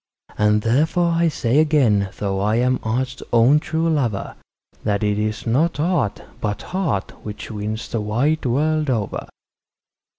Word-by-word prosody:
And 105 Hz, 0 st, +2 dB
therefore 160 Hz, +8 st, +2 dB
I 170 Hz, 0 st, +2 dB
say 135 Hz, -3 st, +1 dB
again, 125 Hz, -11 st, +3 dB
though 95 Hz, -2 st, -1 dB
I 105 Hz, +3 st, +1 dB
am 125 Hz, +2 st, +2 dB
art's 130 Hz, +4 st, -2 dB
own 120 Hz, +6 st, +5 dB
true 160 Hz, +2 st, -1 dB
lover, 130 Hz, -11 st, -1 dB, 0.5 s
That 105 Hz, -1 st, 0 dB
it 105 Hz, 0 st, +1 dB
is 110 Hz, 0 st, -2 dB
not 145 Hz, +8 st, +1 dB
art, 155 Hz, -, 0 dB, 0.2 s
but 105 Hz, -2 st, -3 dB
heart, 160 Hz, -, -1 dB
which 105 Hz, +2 st, -7 dB
wins 105 Hz, +1 st, -4 dB
the 115 Hz, -, -2 dB
wide 125 Hz, +10 st, 0 dB
world 155 Hz, +4 st, +1 dB
over. 110 Hz, -6 st, -2 dB
120 Hz, 145 wpm, -21 LUFS, 105-155 Hz, 0.5 s, own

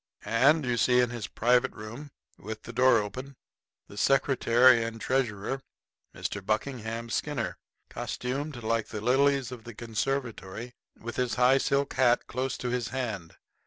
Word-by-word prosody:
And 150 Hz, +6 st, +4 dB
you 120 Hz, -1 st, 0 dB
see 125 Hz, +2 st, +4 dB
in 125 Hz, -1 st, +2 dB
his 120 Hz, -3 st, -5 dB
private 125 Hz, +2 st, +2 dB
room, 115 Hz, +8 st, -8 dB, 0.3 s
with 110 Hz, +2 st, -7 dB
the 120 Hz, -, -9 dB
door 125 Hz, 0 st, +5 dB
open, 125 Hz, +7 st, -4 dB, 0.5 s
the 100 Hz, -, -13 dB
secretary 130 Hz, -3 st, +4 dB
and 115 Hz, 0 st, -5 dB
treasurer, 130 Hz, 0 st, -1 dB, 0.5 s
Mr. 105 Hz, -, -4 dB
Buckingham 115 Hz, +1 st, -2 dB
Skinner, -, -, -2 dB, 0.3 s
costumed 130 Hz, 0 st, -4 dB
like 115 Hz, 0 st, 0 dB
the 110 Hz, -, -5 dB
lilies 135 Hz, +3 st, +2 dB
of 120 Hz, -3 st, -8 dB
the 120 Hz, -2 st, -10 dB
conservatory, 120 Hz, -2 st, -3 dB, 0.3 s
with 120 Hz, +1 st, -7 dB
his 125 Hz, -1 st, 0 dB
high 125 Hz, +2 st, +5 dB
silk 140 Hz, +1 st, 0 dB
hat 125 Hz, -2 st, +3 dB
close 130 Hz, +1 st, -3 dB
to 125 Hz, -, -3 dB
his 125 Hz, -1 st, -1 dB
hand. 110 Hz, -10 st, -4 dB
120 Hz, 150 wpm, -28 LUFS, 115-130 Hz, 0.5 s, door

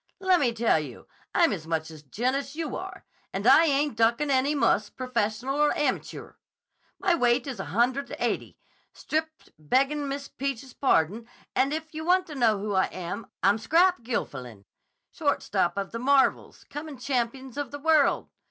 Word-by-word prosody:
'Lemme 360 Hz, -10 st, +3 dB
tell 230 Hz, -7 st, +3 dB
you, 150 Hz, -, -9 dB, 0.3 s
I'm 335 Hz, -9 st, +4 dB
as 160 Hz, -5 st, -6 dB
much 160 Hz, -1 st, -2 dB
a 155 Hz, -2 st, -11 dB
gent 240 Hz, -, -1 dB
as 275 Hz, +1 st, -4 dB
you 320 Hz, -2 st, -3 dB
are. 375 Hz, +1 st, -8 dB, 0.3 s
And -, -, -4 dB
I 330 Hz, -, +7 dB
ain't 290 Hz, -3 st, +1 dB
duckin' 235 Hz, +6 st, +2 dB
any 275 Hz, +3 st, +2 dB
muss, 220 Hz, -5 st, +2 dB
professional 255 Hz, +2 st, -2 dB
or 300 Hz, -, +5 dB
amachure. 295 Hz, -, -3 dB, 0.6 s
My 375 Hz, -2 st, +2 dB
weight 245 Hz, -5 st, +2 dB
is 265 Hz, -7 st, -6 dB
a -, -, -4 dB
hundred 240 Hz, -, 0 dB
and -, -, -7 dB
eighty, -, -, -2 dB, 0.4 s
stripped, 315 Hz, +1 st, -4 dB
beggin' 275 Hz, -, +1 dB
Miss 275 Hz, 0 st, -4 dB
Peach's 270 Hz, -1 st, -5 dB
pardon, 225 Hz, -, +1 dB, 0.3 s
and 270 Hz, +2 st, +2 dB
if 315 Hz, +1 st, -4 dB
you 315 Hz, +1 st, -5 dB
wanta 360 Hz, -1 st, +2 dB
know 235 Hz, -6 st, +2 dB
who 205 Hz, +1 st, -3 dB
I 190 Hz, -1 st, +3 dB
am, 185 Hz, +4 st, -6 dB, 0.2 s
I'm 200 Hz, +3 st, +4 dB
Scrap 355 Hz, +5 st, +3 dB
Gilfillan, 125 Hz, -, -5 dB, 0.5 s
shortstop 175 Hz, +2 st, 0 dB
of 195 Hz, -1 st, -3 dB
the 230 Hz, -, -5 dB
Marvels, 270 Hz, +2 st, +2 dB
comin' 295 Hz, -1 st, -7 dB
champions 255 Hz, 0 st, -2 dB
of 290 Hz, -3 st, -3 dB
the 285 Hz, -, -6 dB
world. 310 Hz, -1 st, +2 dB
260 Hz, 170 wpm, -27 LUFS, 220-295 Hz, 0.6 s, I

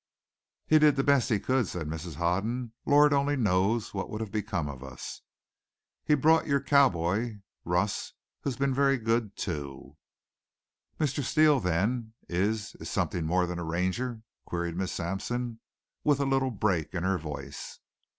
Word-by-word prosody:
"He 155 Hz, -, +5 dB
did 150 Hz, -2 st, +5 dB
the 135 Hz, -, +1 dB
best 140 Hz, -3 st, +3 dB
he 110 Hz, -4 st, +2 dB
could," 130 Hz, +2 st, +1 dB
said 85 Hz, -4 st, -4 dB
Mrs. 80 Hz, +1 st, -5 dB
Hoden. 110 Hz, -, -1 dB
"Lord 145 Hz, 0 st, +6 dB
only 140 Hz, +1 st, +2 dB
knows 105 Hz, -1 st, +1 dB
what 95 Hz, -, -3 dB
would 105 Hz, -, -4 dB
have 110 Hz, -3 st, -4 dB
become 95 Hz, -7 st, -2 dB
of 70 Hz, -2 st, -7 dB
us! 65 Hz, -3 st, -8 dB, 0.8 s
He 150 Hz, -, +4 dB
brought 160 Hz, +3 st, +4 dB
your 140 Hz, -1 st, +3 dB
cowboy, 110 Hz, -, +2 dB, 0.2 s
Russ, 90 Hz, +3 st, 0 dB, 0.3 s
who's 135 Hz, -4 st, -3 dB
been 135 Hz, 0 st, +1 dB
very 135 Hz, 0 st, +3 dB
good 115 Hz, -3 st, 0 dB
too." 70 Hz, -7 st, -5 dB, 1.0 s
"Mr. 145 Hz, -2 st, 0 dB
Steele, 150 Hz, +1 st, +4 dB
then 110 Hz, +5 st, 0 dB
is 100 Hz, +4 st, -1 dB
is -, -, -6 dB
something 80 Hz, -2 st, -1 dB
more 90 Hz, +2 st, +2 dB
than 90 Hz, 0 st, -4 dB
a -, -, -3 dB
Ranger?" 95 Hz, +8 st, -2 dB, 0.2 s
queried 85 Hz, -1 st, -3 dB
Miss 95 Hz, +1 st, -2 dB
Sampson, 115 Hz, +7 st, -3 dB, 0.4 s
with 145 Hz, -2 st, +3 dB
a 140 Hz, -, +1 dB
little 135 Hz, -1 st, +2 dB
break 95 Hz, -7 st, -1 dB
in 85 Hz, -, -1 dB
her 95 Hz, 0 st, +1 dB
voice. 70 Hz, -2 st, -7 dB
105 Hz, 160 wpm, -29 LUFS, 90-135 Hz, 1.0 s, Lord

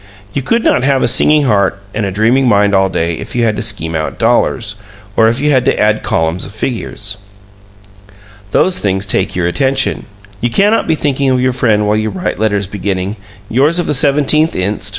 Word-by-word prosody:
You 140 Hz, -, -1 dB
could 230 Hz, -, 0 dB
not -, -, +2 dB
have 135 Hz, 0 st, +1 dB
a -, -, +3 dB
singing 150 Hz, -1 st, +4 dB
heart 100 Hz, -6 st, +1 dB
and 105 Hz, -2 st, -2 dB
a -, -, -3 dB
dreaming 115 Hz, +7 st, +2 dB
mind 100 Hz, -2 st, +3 dB
all 95 Hz, 0 st, +3 dB
day 85 Hz, -2 st, -1 dB
if -, -, -8 dB
you 120 Hz, -, +1 dB
had 110 Hz, -2 st, +1 dB
to -, -, -2 dB
scheme 80 Hz, -7 st, -1 dB
out 80 Hz, -1 st, -3 dB
dollars, 115 Hz, -2 st, +1 dB, 0.4 s
or 110 Hz, -, +4 dB
if 115 Hz, +3 st, 0 dB
you 150 Hz, +1 st, +1 dB
had 130 Hz, -3 st, +3 dB
to -, -, +1 dB
add 105 Hz, 0 st, +2 dB
columns 80 Hz, +2 st, -1 dB
of 100 Hz, -, -8 dB
figures. 105 Hz, -3 st, -4 dB, 1.3 s
Those 180 Hz, -, +1 dB
things 95 Hz, 0 st, -1 dB
take 95 Hz, 0 st, -1 dB
your 90 Hz, -2 st, -1 dB
attention. 135 Hz, +10 st, 0 dB, 0.3 s
You 120 Hz, -, 0 dB
cannot 205 Hz, -, +2 dB
be 160 Hz, -, +2 dB
thinking 140 Hz, -2 st, 0 dB
of 130 Hz, -1 st, +2 dB
your 130 Hz, 0 st, +1 dB
friend 105 Hz, -4 st, +1 dB
while 105 Hz, +1 st, +1 dB
you 110 Hz, 0 st, -1 dB
write 180 Hz, +7 st, -4 dB
letters 105 Hz, -2 st, 0 dB
beginning 100 Hz, 0 st, -3 dB, 0.3 s
"Yours 140 Hz, -, +2 dB
of 175 Hz, -, +1 dB
the -, -, 0 dB
17th 150 Hz, +3 st, +2 dB
inst. 100 Hz, +2 st, -1 dB
110 Hz, 205 wpm, -13 LUFS, 100-135 Hz, 1.3 s, singing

